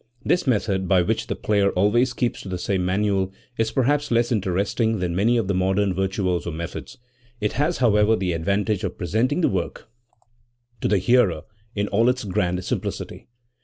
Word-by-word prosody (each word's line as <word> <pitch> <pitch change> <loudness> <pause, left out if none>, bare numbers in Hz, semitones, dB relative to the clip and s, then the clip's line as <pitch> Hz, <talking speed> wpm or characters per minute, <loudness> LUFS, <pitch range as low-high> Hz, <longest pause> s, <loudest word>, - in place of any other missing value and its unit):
This 175 - +1
method, 100 -5 +1
by 90 -2 +4
which 110 +5 -1
the - - -2
player 100 -2 +1
always 115 +7 +2
keeps 120 -1 -2
to 95 - -8
the 90 - -3
same 95 +1 -1
manual, 95 0 0 0.3
is 115 0 +2
perhaps 145 +4 +1
less 115 0 +2
interesting 105 +2 0
than 90 -2 -2
many 115 +6 +3
of 115 -5 0
the 100 - 0
modern 95 +1 +1
virtuoso 95 -3 -1
methods 85 +9 -6
;r 125 - -40 0.4
it 105 - 0
has, 150 +6 0
however, 110 -3 +4
the 90 -3 -1
advantage 100 +4 0
of 95 -2 -3
presenting 120 - 0
the - - +4
work 95 +4 -4 0.9
to - - +1
the 105 - +3
hearer 95 -5 +2 0.3
in 100 0 0
all 115 +4 +3
its 125 0 -1
grand 90 -2 -1
simplicity. - - -4
100 Hz, 180 wpm, -23 LUFS, 95-115 Hz, 0.9 s, by